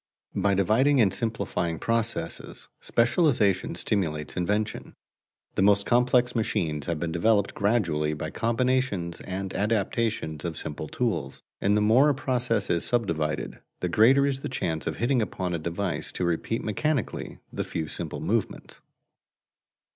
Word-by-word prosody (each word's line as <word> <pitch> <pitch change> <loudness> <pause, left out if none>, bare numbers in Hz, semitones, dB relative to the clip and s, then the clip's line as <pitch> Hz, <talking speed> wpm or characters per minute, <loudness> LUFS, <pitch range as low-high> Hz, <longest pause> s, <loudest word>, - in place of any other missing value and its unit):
By 100 0 +2
dividing 120 +9 +3
and 100 -5 +4
simplifying 95 -7 -2
processes, 115 +3 -3
specialization 120 - +2
stimulates 75 -7 -1
invention. 105 +4 -2 0.6
The - - 0
most 100 0 +4
complex 125 0 +3
machines 85 - -1
have 85 -3 -1
been 85 0 -2
developed 100 +4 +2
gradually 85 -8 +1
by - - -5
combinations 115 -7 0
and 95 +1 -4
adaptations 105 -6 -1
of 85 -3 -3
simple - - -5
tools, - - -2 0.2
and 100 +2 +3
the - - +2
more 120 +8 +5
a 145 - +2
process 125 -6 0
is 85 - +1
subdivided, 80 -10 -1 0.2
the 90 - -1
greater 130 +9 +5
is 135 -1 0
the - - -5
chance 80 -11 -2
of 80 - -1
hitting 125 +1 +1
upon 90 -4 -3
a 85 - -1
device 85 0 -3
to 90 - -1
repeat 85 +7 -1
mechanically 130 +4 -2 0.2
the - - -2
few 80 -2 -4
simple - - -5
movements. - - -2
105 Hz, 140 wpm, -26 LUFS, 85-120 Hz, 0.6 s, more